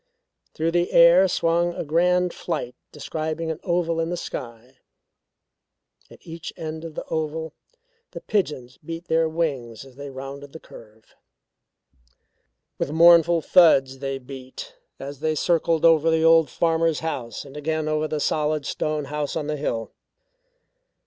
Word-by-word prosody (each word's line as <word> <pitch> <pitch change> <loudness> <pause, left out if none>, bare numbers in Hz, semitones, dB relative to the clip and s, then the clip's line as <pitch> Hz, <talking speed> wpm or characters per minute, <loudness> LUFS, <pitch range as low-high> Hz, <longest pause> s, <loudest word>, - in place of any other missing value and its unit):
Through 160 +1 0
the 175 +1 0
air 170 +3 +7
swung 170 0 0
a - - -3
grand 180 +3 +2
flight 150 -8 -4 0.2
describing 160 +2 -4
an 160 - -6
oval 170 -2 0
in 165 0 -1
the 175 - -3
sky. 120 -4 -8 1.3
At - - -14
each 165 -1 -7
end 160 0 -6
of 165 -2 -8
the - - -4
oval 160 0 -3 0.6
the - - -9
pigeons 140 -11 -2
beat 165 +2 -7
their 160 0 +2
wings 135 -8 -3
as 130 -1 -17
they 140 0 -7
rounded 135 +1 -9
the 160 - -9
curve. 110 -5 -16 1.7
With - - -1
mournful 170 0 +6
thuds 135 -7 +4
they 135 0 -3
beat, 130 - -10 0.2
as 140 0 -8
they 155 0 -1
circled 165 +1 +1
over 165 -1 +5
the 160 0 +2
old 165 -1 +5
farmer's 165 -1 +1
house 130 -9 -5
and 140 - -13
again 155 +1 -2
over 155 0 0
the 155 -1 -3
solid 150 0 0
stone 155 -1 -2
house 145 0 -4
on 155 -2 -2
the 150 0 -2
hill. 115 -6 -3
155 Hz, 150 wpm, -23 LUFS, 140-165 Hz, 1.7 s, air